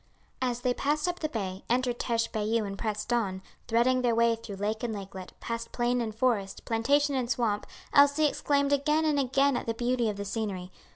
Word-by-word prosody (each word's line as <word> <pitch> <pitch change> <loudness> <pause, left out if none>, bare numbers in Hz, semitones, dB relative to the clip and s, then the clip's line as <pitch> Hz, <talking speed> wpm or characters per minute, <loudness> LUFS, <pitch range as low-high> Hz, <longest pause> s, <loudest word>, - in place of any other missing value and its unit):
As 245 -1 -1
they 250 -1 +1
passed 295 +5 0
up 355 0 -2
the 310 - -2
bay, 195 -6 -4
entered 245 0 +1
Teche 230 -1 0
Bayou 220 +1 0
and 195 0 -5
pressed 215 +2 -2
on, 195 -5 -1 0.2
threading 245 +2 +3
their 240 -2 +2
way 230 0 +4
through 225 -3 -8
lake 210 +3 -2
and 230 -3 -2
lakelet, 190 -2 -8
past 230 0 -4
plain 245 0 +1
and 220 -2 -3
forest, 225 -5 0
plantation 280 +6 +2
and 255 -3 -1
swamp, 225 -4 0 0.3
Elsie 285 +2 +6
exclaimed 280 -1 +1
again 300 +3 +2
and 300 -2 +2
again 275 +1 +2
at - - -3
the 230 - -1
beauty 240 -1 +1
of 205 - -4
the 200 - -4
scenery. 200 -3 -3
235 Hz, 205 wpm, -29 LUFS, 215-260 Hz, 0.3 s, Elsie